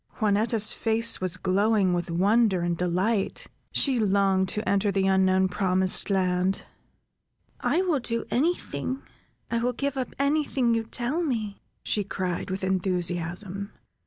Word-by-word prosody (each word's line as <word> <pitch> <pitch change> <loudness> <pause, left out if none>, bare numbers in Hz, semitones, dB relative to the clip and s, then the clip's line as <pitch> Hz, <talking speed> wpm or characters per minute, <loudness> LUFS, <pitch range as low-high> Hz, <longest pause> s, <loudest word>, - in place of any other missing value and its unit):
Juanetta's 215 +1 +2
face 225 -1 +1
was 185 -1 -1
glowing 195 +1 +2
with 175 -1 -2
wonder 195 +2 +3
and 175 0 0
delight; 185 +5 0 0.3
she 265 -4 +2
longed 195 -2 +2
to 215 - -2
enter 200 +1 +2
the 195 0 +1
unknown 190 0 +3
promised 185 +1 +1
land: 185 -1 +1 0.9
"I 365 - +1
will 335 -7 +1
do 230 -1 -3
any 325 +8 +2
thing, 260 - -5 0.5
I 235 - +1
will 245 +2 0
give 280 +2 -2
up 255 -2 -4
any 285 +3 +2
thing 250 -5 +1
you 225 -1 0
tell 250 +8 -2
me, 225 -10 -3 0.2
she 210 - 0
cried, 185 -1 -3
with 190 +1 -4
enthusiasm." 185 +1 -2
200 Hz, 145 wpm, -26 LUFS, 185-230 Hz, 0.9 s, wonder